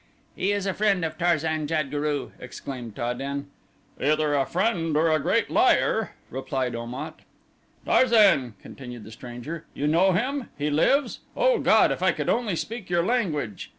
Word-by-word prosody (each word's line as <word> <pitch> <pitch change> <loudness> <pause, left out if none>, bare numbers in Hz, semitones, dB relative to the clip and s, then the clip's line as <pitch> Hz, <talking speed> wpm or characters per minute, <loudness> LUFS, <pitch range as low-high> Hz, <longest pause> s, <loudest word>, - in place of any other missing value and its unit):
"He 195 - 0
is 205 -1 -1
a 195 - 0
friend 200 -4 +1
of 160 - -4
Tarzan 160 -3 +1
jad 155 -3 -1
guru," 145 -1 -2
exclaimed 125 -3 -8
Ta 120 +1 -2
den. 140 +2 -5 0.5
"Either 150 +1 +2
a 140 -2 +1
friend 170 -5 0
or 160 +1 +3
a 155 - +3
great - - 0
liar," - - +2 0.2
replied 130 -1 -2
Om 115 +1 -6
at. - - -7 0.7
"Tarzan," 200 - +4
continued 125 -4 -9
the 110 - -11
stranger, 125 +8 -8
"you 145 - -2
know 170 +6 +4
him? 260 +6 -1
He 150 +1 -1
lives? 270 - +2 0.2
O - - +3
God, - - +4
if - - -3
I - - +3
could - - -3
only 230 -6 +1
speak 220 +3 -5
your 175 -1 +2
language." 165 - -1
155 Hz, 170 wpm, -25 LUFS, 135-190 Hz, 0.7 s, Tarzan